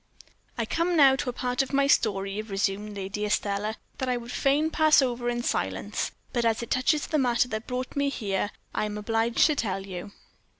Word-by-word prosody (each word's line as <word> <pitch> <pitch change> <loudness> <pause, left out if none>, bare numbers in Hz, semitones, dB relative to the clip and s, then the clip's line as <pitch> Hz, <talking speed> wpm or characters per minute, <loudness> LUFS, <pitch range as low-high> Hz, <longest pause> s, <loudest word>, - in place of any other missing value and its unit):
"I 230 - 0
come 335 +8 0
now 275 -3 +7
to 260 - -2
a - - -3
part 250 +1 0
of 270 +1 -4
my 275 0 +4
story," 200 -6 +1
resumed 205 0 -2
Lady 195 +2 -4
Estelle, 210 +1 -1 0.2
"that 260 - -1
I 250 - +1
would 240 0 -8
fain 290 +5 +2
pass 310 -1 +5
over 245 -2 0
in 240 0 -2
silence; - - -1 0.2
but 240 - +1
as 230 0 +1
it 235 - -9
touches 285 +4 +2
the 310 - 0
matter 245 -2 +2
that 220 -1 -4
brought 255 0 -4
me 280 0 +1
here, 205 -6 -2 0.2
I - - 0
am 210 0 -4
obliged 225 +2 +2
to 305 - +3
tell 195 -6 -2
you." 190 +1 -7
235 Hz, 205 wpm, -27 LUFS, 210-265 Hz, 0.2 s, now